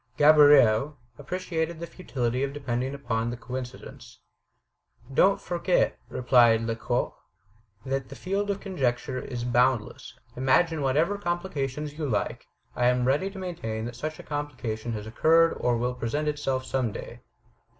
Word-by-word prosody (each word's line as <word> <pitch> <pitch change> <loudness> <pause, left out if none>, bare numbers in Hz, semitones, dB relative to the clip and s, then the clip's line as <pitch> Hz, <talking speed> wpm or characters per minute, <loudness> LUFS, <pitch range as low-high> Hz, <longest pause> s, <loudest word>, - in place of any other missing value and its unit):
Gaboriau 145 -3 +6 0.2
appreciated 170 -3 -3
the 170 - -4
futility 130 -9 -3
of 140 0 -1
depending 130 -1 -2
upon 120 -4 -2
the 120 - -5
coincidence: 125 0 -8 1.0
"Don't 195 +8 +4
forget," 175 +1 +1
replied 120 -3 +4
Lecoq, 115 +2 -1 0.7
"that 135 -1 -2
the 135 - -9
field 200 +5 -2
of 200 0 -1
conjecture 130 -9 -2
is 120 -1 -5
boundless. 125 -2 0 0.2
Imagine 150 +5 +2
whatever 155 +9 +1
complication 155 -6 -2
you 150 0 -4
like, 105 - -2 0.3
I 120 - +2
am 125 0 +2
ready 145 +9 +1
to 195 - -11
maintain 115 -13 -4
that 120 +1 -6
such 155 +5 -5
a - - -10
complication 130 -6 -4
has 105 -1 -5
occurred 165 +8 +4
or 120 -1 +1
will 125 +2 -1
present 135 +6 -2
itself 135 -3 -1
some 130 -4 -1
day. - - -8
135 Hz, 140 wpm, -27 LUFS, 120-155 Hz, 1.0 s, Gaboriau